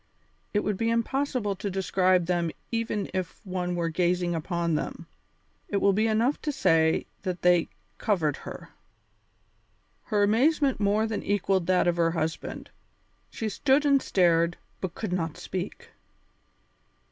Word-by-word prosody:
It 205 - +1
would 210 -2 -1
be 225 +2 0
impossible 230 -2 0
to 200 - -4
describe 185 -1 +2
them 175 -1 0 0.2
even 225 -3 -1
if 185 -2 -3
one 180 -1 -2
were 170 -1 0
gazing 175 +1 +1
upon 170 0 -1
them. 150 - -3 0.6
It 200 - 0
will 200 0 +3
be 215 +3 +2
enough 230 +6 +1
to 300 - -1
say 160 - +2 0.2
that 185 -2 -4
they 175 -1 +4 0.3
covered 170 - +1
her. - - -9 1.4
Her 205 -1 +1
amazement 265 +6 +3
more 210 +1 +2
than 220 -2 -2
equalled 195 -3 0
that 185 -1 +3
of 175 0 +2
her 165 -1 +3
husband; 165 -1 -4 0.6
she 225 - -4
stood 270 +7 +2
and 280 -2 +4
stared, 170 -4 +2 0.2
but 185 -3 -4
could 210 -5 -3
not 165 -4 -2
speak. 205 - -6
190 Hz, 145 wpm, -27 LUFS, 175-220 Hz, 1.4 s, they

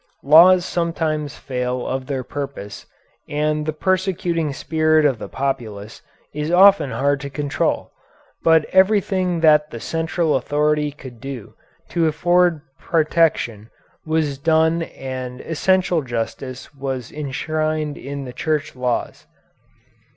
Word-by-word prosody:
Laws 175 +5 +7
sometimes 160 -3 -2
fail 125 -1 -3
of 130 0 -3
their 135 -3 -2
purpose 135 -7 -7 0.4
and 150 +1 -1
the - - +1
persecuting 175 -2 -1
spirit 155 +1 +2
of 135 -6 +2
the - - -7
populace 110 -6 -4 0.3
is 150 +1 -3
often 180 -4 +6
hard 140 +4 0
to 140 - -5
control, 140 0 -2 0.5
but 160 -1 +5
everything 190 -3 +2
that 150 -1 +5
the 115 - -7
central 165 +2 -1
authority 150 +3 +1
could 130 -5 -12
do 135 -6 -7 0.4
to 165 -2 +1
afford 175 +1 +2 0.2
protection 155 -9 +1 0.3
was 155 -3 -1
done 160 +2 +2
and 130 -5 -6
essential 180 +1 +1
justice 130 +2 -5
was 135 -3 -5
enshrined 155 +1 -2
in 140 0 -6
the 125 - -8
Church 155 +2 -2
laws. 125 -1 -3
150 Hz, 120 wpm, -21 LUFS, 135-165 Hz, 0.5 s, Laws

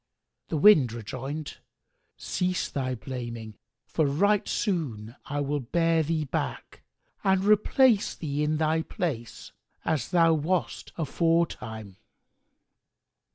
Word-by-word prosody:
The 160 - -2
Wind 150 - +6
rejoined, 135 +7 -6 0.6
"Cease 180 -1 -1
thy 130 -2 -2
blaming, 120 -3 -6 0.3
for 155 -3 0
right 200 +9 +2
soon 125 - -2
I 145 +1 -2
will 145 +1 -1
bear 165 +5 +1
thee 160 0 -1
back 140 - -4 0.4
and 190 -1 +3
replace 215 +2 +4
thee 145 -2 -3
in 155 +1 +1
thy 160 +1 +1
place, 145 -9 -5 0.3
as 150 -6 -1
thou 165 -2 +4
wast 165 +4 -1
aforetime." 150 - -1
155 Hz, 110 wpm, -27 LUFS, 130-170 Hz, 0.6 s, Wind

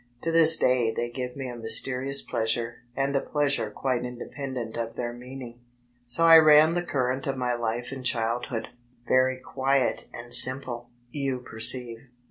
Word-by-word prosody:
To 165 - -1
this 165 -1 +7
day 125 -3 +1
they 120 +1 -4
give 125 0 -6
me 135 -1 -6
a 120 - -7
mysKrious 130 +4 +1
pleasure 115 +1 -2 0.2
and 140 +1 -1
a 135 - +1
pleasure 140 -7 -1
quite 125 +3 -2
independent 125 -1 -7
of 115 -1 -5
their 120 -1 -4
meaning. 125 -1 -10 0.5
So 165 +8 +1 0.2
ran 155 +1 +6
the 175 - -1
current 130 -6 -2
of 135 -1 -2
my 125 -1 -1
life 120 +1 -4
in 135 -1 -7
childhood, 120 -1 -2 0.4
very 130 0 +2
quiet 130 0 -1
and 120 +1 -8
simple, 130 -2 +1 0.2
you 135 -3 -3
perceive. 115 0 +1
125 Hz, 155 wpm, -25 LUFS, 120-135 Hz, 0.5 s, this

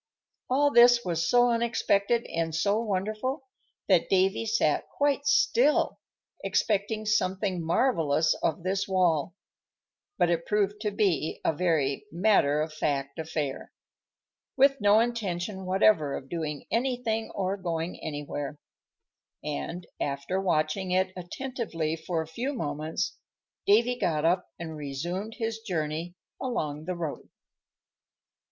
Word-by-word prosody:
All 285 +3 +3
this 240 -1 +6
was 170 -2 0
so 245 0 +5
unexpected 230 -1 +1
and 165 -1 -2
so 200 +5 +2
wonderful 215 +6 -2 0.4
that 185 -4 +3
Davy 195 +4 +2
sat 220 -9 +1
quite 285 0 0
still, 280 0 +3 0.4
expecting 215 +1 0
something 190 -3 0
marvellous 160 - +2
of 165 +1 -1
this 190 +1 -1
wall; 180 -4 +1 0.8
but 175 - +3
it 170 -1 -1
proved 210 0 0
to 215 - 0
be 195 -6 0
a - - +3
very 155 -2 0
matter 170 -6 +3
of 155 0 -3
fact 140 -1 -2
affair, 155 -4 -3 0.9
with 275 -2 +4
no 205 +1 +6
intention 195 -5 -2
whatever 185 -6 +3
of 135 - -11
doing 155 -4 -4
anything 235 -2 0
or 190 0 -1
going 170 -3 -4
anywhere, 145 -1 -5 0.9
and, 170 - -4
after 140 +7 -2
watching 175 +1 0
it 185 +1 +1
attentively 180 -4 -3
for 165 0 -2
a - - -13
few 245 - -3
moments, 155 - -3 0.5
Davy 235 +4 +4
got 155 -2 0
up 180 +2 +1
and 160 -2 -6
resumed 170 +9 -4
his 225 -2 -2
journey 170 -4 -3 0.3
along 155 - -3
the 185 +1 -3
road. 165 -4 -5
185 Hz, 125 wpm, -28 LUFS, 160-220 Hz, 0.9 s, this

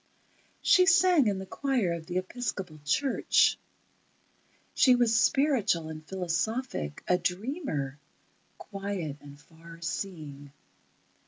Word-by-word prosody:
She 365 -1 +5
sang 360 - +5
in 200 -2 0
the 190 - -6
choir 245 -6 -1
of 165 -1 -7
the 180 0 -3
Episcopal 185 -5 -4
Church. 260 - +2 1.1
She 255 -2 +5
was 240 -2 +2
spiritual 240 - +2
and 155 0 -8
philosophic, 180 - -3
a 180 0 +3
dreamer, 180 - -3 0.6
quiet 195 -7 -5
and 145 0 -13
far 165 +2 -15
seeing. 155 -6 -6
185 Hz, 105 wpm, -28 LUFS, 160-245 Hz, 1.1 s, She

